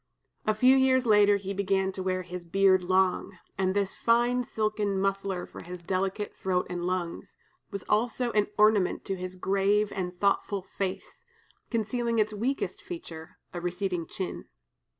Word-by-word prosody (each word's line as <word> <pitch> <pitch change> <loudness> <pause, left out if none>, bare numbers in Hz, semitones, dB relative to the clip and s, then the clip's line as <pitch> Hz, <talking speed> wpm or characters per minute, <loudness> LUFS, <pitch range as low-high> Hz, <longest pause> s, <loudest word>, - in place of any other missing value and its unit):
A 215 - +3
few 255 +4 +6
years 260 -1 +4
later 205 -2 +5
he 195 0 -5
began 195 -1 +1
to 190 - -6
wear 185 0 -1
his 180 0 -7
beard 190 +1 +3
long, 185 +1 +1 0.2
and 190 0 0
this 200 -1 0
fine 240 +2 +2
silken 215 -3 -1
muffler 195 -1 -1
for - - -11
his 180 0 -9
delicate 195 +3 -2
throat 180 -1 0
and 175 -1 -3
lungs, 180 -2 -3 0.3
was 200 -2 -5
also 235 +3 +1
an 210 -2 +2
ornament 210 -3 +3
to 195 - -2
his 185 0 -6
grave 200 +3 +1
and 180 -1 -4
thoughtful 200 -1 +1
face, 190 0 -5 0.5
concealing 230 +1 -1
its 215 0 +2
weakest 245 +7 -2
feature, 165 - -9 0.2
a 175 - -4
receding 180 -1 -2
chin. 185 - -5
195 Hz, 155 wpm, -28 LUFS, 185-215 Hz, 0.5 s, few